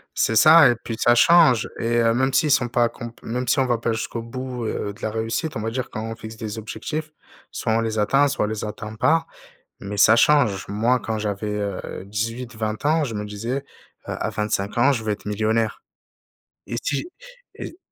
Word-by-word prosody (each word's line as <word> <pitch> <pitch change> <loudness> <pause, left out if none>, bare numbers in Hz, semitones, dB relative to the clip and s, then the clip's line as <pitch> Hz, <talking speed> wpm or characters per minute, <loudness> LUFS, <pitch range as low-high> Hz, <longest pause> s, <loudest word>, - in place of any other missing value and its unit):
C'est 110 - +1
ça 155 +4 +8
et - - +2
puis, 115 - -4
ça 120 - +4
change 130 -4 +5
et 120 +1 0
heu, 115 0 +3
même 130 +2 +1
s'ils 155 +2 +2
sont 125 -3 +3
pas 120 0 +2
accompl 120 0 -6
même 125 +3 -3
si 140 - +2
on 130 - +2
va 120 -2 +1
pas 115 0 -1
jusqu'au 115 +1 -4
bout, 125 +1 -6
heu, 100 -1 -3
de 105 - -18
la - - -1
réussite, 115 +8 -3
on - - -2
va 110 +1 -2
dire, 125 +2 -3
quand 110 - -5
on 115 0 -5
fixe 110 0 -9
des 110 -1 -6
objectifs, 150 +8 -5 0.4
soit 110 - -2
on 115 - +2
les 110 -1 -2
atteint, 135 +7 +3
soit 135 - -1
on - - -1
les 110 -1 -4
atteint 105 +1 -6
pas 160 +8 +2 0.6
mais 100 +1 -5
ça 110 +2 +6
change. 120 -8 +3
Moi, 115 +5 +1
quand 110 -1 -3
j'avais, 105 0 -3
heu, 100 -2 -5
18-20 110 +2 -4
ans, 155 +1 +3
je 120 -6 -4
me 105 0 -4
disais, 110 +5 -4
heu: - - -28 0.4
«À - - -3
25 105 0 -2
ans 135 +4 +5
je 120 -5 -2
veux 110 - -1
être 105 - -6
millionnaire». 110 +1 0 0.9
Et 120 - -4
si 145 - -1 0.5
et - - -8
115 Hz, 215 wpm, -22 LUFS, 110-125 Hz, 0.9 s, ça